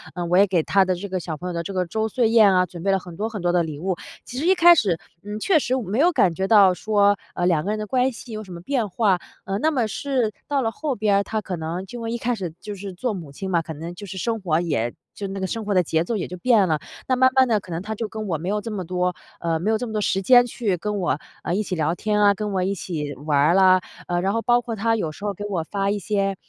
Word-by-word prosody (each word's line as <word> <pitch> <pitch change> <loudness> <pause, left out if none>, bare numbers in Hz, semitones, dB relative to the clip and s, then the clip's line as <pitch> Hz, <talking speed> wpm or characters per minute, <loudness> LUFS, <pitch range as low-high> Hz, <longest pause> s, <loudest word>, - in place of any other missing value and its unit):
呃， 175 - -3
我 175 +2 +2
也 200 +1 +6
给 175 -4 +1
她 195 -1 +3
的 185 -1 0
这 200 +3 -6
个 185 -1 -2
小 160 -2 -5
朋 180 - -6
友 - - -4
的 170 - -2
这 195 - -6
个 185 -1 0
周 220 +6 -1
岁 225 0 +1
宴 220 -4 +6
啊， 180 0 +4
准 170 -1 -10
备 200 - 0
了 195 - +3
很 175 -2 -11
多 215 +2 -1
很 210 -5 -6
多 175 - +2
的 175 - +3
礼 155 -3 -5
物。 185 +3 -2 0.3
其 250 - -8
实 305 - -2
一 380 - +5
开 345 0 +8
始， 195 - +2 0.3
嗯， 210 +1 -5
确 325 - +3
实 260 -1 0
我 255 - -2
没 210 +7 -2
有 345 +4 +5
感 180 - +3
觉 190 +2 -2
到 200 -4 +6
说 205 +2 +2 0.2
呃， 175 - 0
两 165 -4 +2
个 - - -2
人 215 - -1
的 215 - -3
关 255 +3 +2
系 230 +1 -11
有 215 0 -5
什 185 - -10
么 170 - -8
变 235 +1 -1
化， 195 -2 +2 0.2
呃， 195 +1 -2
那 315 - +2
么 245 -6 +1
是 250 -1 -1 0.2
到 285 -2 +1
了 225 - 0
后 280 +1 -3
边 205 -1 +2
儿， 200 - +2
她 215 +1 -3
可 185 -3 -5
能 165 +4 -4
就 235 +1 -6
一 235 +1 -2
开 245 +1 -1
始 185 -7 -4
就 210 -1 -6
是 195 -1 -7
做 225 +5 -2
母 165 -7 -7
亲 190 +5 -5
嘛， 170 - +3
可 160 0 -7
能 165 +4 -7
就 200 +3 -9
是 190 - -7
生 225 +4 -1
活 170 -4 +1
也 120 -9 -1 0.2
就 200 - -5
那 195 0 -5
个 190 - -1
生 225 +1 -4
活 205 - 0
的 185 - +5
节 160 +1 +1
奏 230 - -2
也 190 - -2
就 180 - -6
变 220 -2 +4
了。 155 -1 +1 0.3
那 255 - +2
慢 260 0 +6
慢 260 -1 +5
地， 220 -3 +2
可 185 - -13
能 165 +2 -3
她 215 +2 -4
就 225 0 -3
跟 215 -1 -6
我 165 -4 -1
没 170 +4 -6
有 210 +1 0
这 225 - -6
么 195 -3 -3
多 180 0 0 0.3
呃， 165 -1 0
没 205 +6 -1
有 220 - +2
这 245 - -4
么 220 - -6
多 210 - 0
时 195 -1 +1
间 245 +5 +6
去 225 -5 -1
跟 210 +3 -3
我 175 -6 0 0.3
呃， 170 - -1
一 215 - 0
起 185 - -5
聊 160 +1 0
天 210 +1 0
啊、 205 -1 +6
跟 210 +1 -4
我 190 - +1
一 195 +2 0
起 150 -6 -4
玩 145 +1 -1
儿 150 +4 +4
了， 185 -1 +6 0.3
呃， 175 0 0
然 195 +2 0
后 230 - 0
包 240 +1 +3
括 230 -1 -5
她 225 +2 +1
有 165 -7 -2
时 205 - -13
候 205 - -1
给 205 - -8
我 185 -6 -2
发 195 +3 -2
一 205 - 0
些 195 -2 0
200 Hz, 340 characters per minute, -23 LUFS, 175-220 Hz, 0.3 s, 开